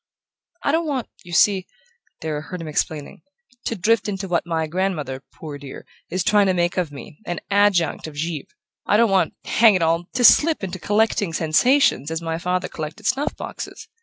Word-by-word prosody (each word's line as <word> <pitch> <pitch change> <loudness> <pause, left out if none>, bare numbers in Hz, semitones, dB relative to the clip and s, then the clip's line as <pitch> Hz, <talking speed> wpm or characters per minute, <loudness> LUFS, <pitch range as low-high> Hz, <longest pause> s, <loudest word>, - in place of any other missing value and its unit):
"I - - +2
don't 325 +1 +1
want, 265 -5 -2
you 175 - -12
see," 190 +1 +3 0.5
Darrow 155 -2 -3
heard 180 +3 -7
him 165 - -6
explaining, 150 -1 -3 0.4
"to 230 - -1
drift 215 +2 +2
into 195 -1 -4
what 175 -1 0
my 165 -1 0
grandmother, 155 -6 -2
poor 150 -3 -8
dear, 140 -1 -10 0.2
is 185 0 -1
trying 205 -1 +4
to 185 - +2
make 175 0 +1
of 175 -5 -1
me: 145 +1 -11
an 175 - -2
adjunct 200 -7 +2
of 155 - -10
Givre. 155 -1 -3 0.4
I 205 - +4
don't 230 -2 +4
want 190 -1 +2
hang 225 -3 +5
it 180 - +1
all! 165 +1 +1
to 250 - 0
slip 310 +2 +6
into 185 -1 -4
collecting 205 -3 +1
sensations 160 - +3
as 160 0 -2
my 165 0 -3
father 180 +1 -1
collected 160 +7 -7
snuff 270 +7 0
boxes. - - -7
180 Hz, 190 wpm, -22 LUFS, 160-205 Hz, 0.5 s, slip